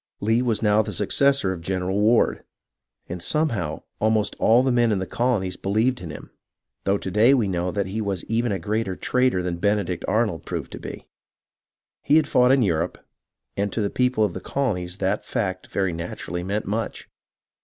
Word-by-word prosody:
Lee 115 +3 +2
was 115 -3 0
now 105 0 +4
the 110 - -4
successor 135 +1 +2
of 85 - -8
General 95 +2 -1
Ward, 110 +3 +3 0.6
and 90 0 -6
some 155 - +1
how 85 - -3 0.2
almost 110 -1 +1
all 120 +3 +5
the 130 - +2
men 120 -2 +3
in 105 - +2
the 95 - -2
colonies 100 -6 -1
believed 110 +6 0
in 85 - -7
him, 75 - -9 0.5
though 100 +1 +2
to 95 - -5
day 115 +8 +5
we 115 -6 +1
know 90 -1 -1
that 100 +1 -1
he 100 +4 -3
was 100 -4 -2
even 115 +1 0
a 100 - 0
greater 105 +2 -2
traitor 125 -7 +1
than 90 -1 -2
Benedict 100 -2 0
Arnold 105 -7 0
proved - - -5
to - - -7
be. - - -8 1.0
He 145 - +3
had 155 -2 +4
fought 125 0 +4
in 135 -2 +4
Europe, 85 -3 0 0.6
and 100 0 -1
to 115 - -1
the 100 - -1
people 125 -3 +2
of - - -3
the - - -6
colonies 95 -10 -2
that 100 +1 -1
fact 95 -2 -3
very 95 -3 -1
naturally 85 +1 -5
meant 100 +3 -2
much. 110 +3 -3
105 Hz, 195 wpm, -24 LUFS, 95-115 Hz, 1.0 s, all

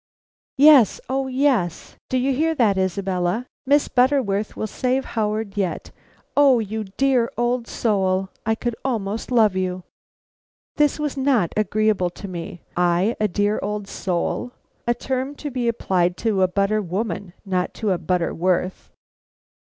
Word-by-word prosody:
"Yes, 280 -6 +7
oh, 265 0 0
yes. 255 - 0
Do 260 - +1
you 265 +2 +1
hear 320 +4 +1
that, 220 -8 +3
Isabella? 190 +2 -1 0.2
Miss 290 +1 +4
Butterworth 245 -6 +1
will - - -2
save 255 +4 -1
Howard 215 -2 -1
yet. 190 -4 -2 0.4
O 280 -3 +6
you 220 -1 -3
dear 265 -4 +2
old 240 0 0
soul. 190 -3 0
I 220 0 +1
could 240 0 -3
almost 220 -4 -2
love 220 -6 +4
you!" 185 -1 -2 0.9
This 295 -1 +3
was 295 -2 -3
not 260 - +2
agreeable 215 -2 +1
to 190 +3 -9
me. 175 -1 -7
I 175 +5 +2
a 215 - +2
dear 205 +2 0
old 210 -1 -3
soul! 195 +7 -2 0.3
A 240 - +2
term 260 +3 -3
to 290 0 -6
be 245 -2 -1
applied 180 -6 +1
to 210 -4 +2
a 185 - +5
butter 200 +3 +1
woman 190 -1 -4
not 185 -2 -1
to 215 -3 -1
a 180 - 0
Butterworth. 180 +1 -1
215 Hz, 145 wpm, -22 LUFS, 185-255 Hz, 0.9 s, Yes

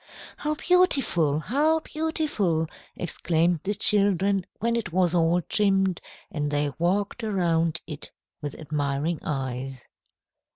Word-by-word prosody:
"How 300 +1 -2
beautiful! 270 - +2
How 295 - +2
beautiful!" 305 - -1 0.3
exclaimed 170 0 0
the 205 +2 0
children 200 -2 +3
when 235 +3 0
it 225 -6 -2
was 180 -1 +2
all 170 0 +2
trimmed, 195 -2 +1 0.3
and 145 -2 -2
they 145 0 0
walked 200 +6 0
around 170 -5 +1
it 150 -2 -7 0.3
with 145 -2 -5
admiring 150 +1 -2
eyes. 130 -2 -4
175 Hz, 115 wpm, -26 LUFS, 155-210 Hz, 0.3 s, children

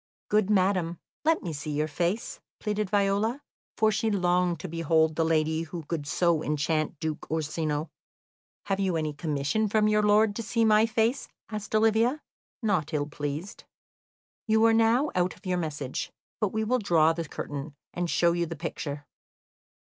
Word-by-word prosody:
"Good 210 -1 +2
madam, 185 -4 +2 0.3
let 320 +1 +2
me 170 - -4
see 150 +1 -5
your 150 +1 0
face," 175 +8 -2 0.2
pleaded 210 -2 -2
Viola, 205 +6 +1 0.3
for 220 0 +4
she 215 +2 0
longed 180 -3 +1
to - - -5
behold 160 -1 +2
the 165 - +2
lady 160 0 +1
who 165 0 -6
could 145 -1 -4
so 170 0 +2
enchant 155 +1 -1
Duke 155 -1 -4
Orsino. 155 0 -2 0.7
"Have 195 -1 -1
you 190 -3 +1
any 155 -1 -2
commission 150 +7 -1
from 215 +1 +2
your 210 0 +3
lord 210 0 +4
to - - -2
see 230 +1 +1
my 215 +1 +5
face?" 230 +2 0 0.2
asked 210 0 -4
Olivia, 225 +6 +3 0.4
not 175 -8 0
ill 145 -1 0
pleased. 145 +5 -5 0.8
"You 220 +1 +4
are 225 - +5
now 230 +6 +3
out 180 0 0
of - - -22
your 180 -1 0
message; 145 -5 -4 0.3
but 210 -3 0
we 220 0 -1
will 250 +4 +1
draw 165 -6 +4
the 165 -2 -5
curtain, 145 +1 -6 0.2
and 175 -1 -2
show 170 0 +3
you 170 0 0
the 165 - -5
picture. 145 -2 -5
175 Hz, 170 wpm, -27 LUFS, 155-215 Hz, 0.8 s, my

